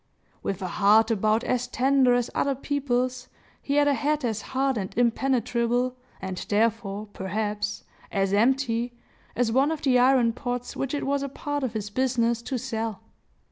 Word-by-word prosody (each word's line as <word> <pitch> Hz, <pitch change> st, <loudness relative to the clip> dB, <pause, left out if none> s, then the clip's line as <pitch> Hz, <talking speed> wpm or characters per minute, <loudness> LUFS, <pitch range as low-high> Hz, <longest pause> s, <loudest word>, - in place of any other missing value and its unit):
With 195 Hz, -1 st, -3 dB
a -, -, -1 dB
heart 210 Hz, +5 st, +4 dB
about 215 Hz, +2 st, +2 dB
as 250 Hz, 0 st, 0 dB
tender 260 Hz, 0 st, +3 dB
as 245 Hz, -1 st, -1 dB
other 280 Hz, -1 st, +1 dB
people's, 255 Hz, -2 st, -1 dB, 0.3 s
he 280 Hz, -, -2 dB
had 290 Hz, 0 st, +4 dB
a 285 Hz, -, +4 dB
head 295 Hz, 0 st, 0 dB
as 220 Hz, -2 st, -1 dB
hard 265 Hz, 0 st, 0 dB
and 195 Hz, -4 st, -3 dB
impenetrable, 245 Hz, 0 st, +1 dB, 0.2 s
and 190 Hz, -1 st, -5 dB
therefore, 215 Hz, -1 st, 0 dB
perhaps, 210 Hz, +2 st, -3 dB, 0.3 s
as 195 Hz, -1 st, 0 dB
empty, 240 Hz, +1 st, +2 dB, 0.4 s
as 240 Hz, -2 st, +1 dB
one 270 Hz, +5 st, +3 dB
of 320 Hz, -2 st, -3 dB
the 255 Hz, -3 st, +4 dB
iron 250 Hz, -2 st, +4 dB
pots 245 Hz, 0 st, -4 dB
which 270 Hz, +2 st, -2 dB
it 285 Hz, -, -2 dB
was 280 Hz, 0 st, 0 dB
a 280 Hz, -, -3 dB
part 290 Hz, +2 st, -4 dB
of 255 Hz, -4 st, -2 dB
his 210 Hz, -2 st, -4 dB
business 235 Hz, -1 st, +1 dB
to 260 Hz, +2 st, -3 dB
sell. 225 Hz, -4 st, -4 dB
245 Hz, 170 wpm, -26 LUFS, 220-265 Hz, 0.4 s, heart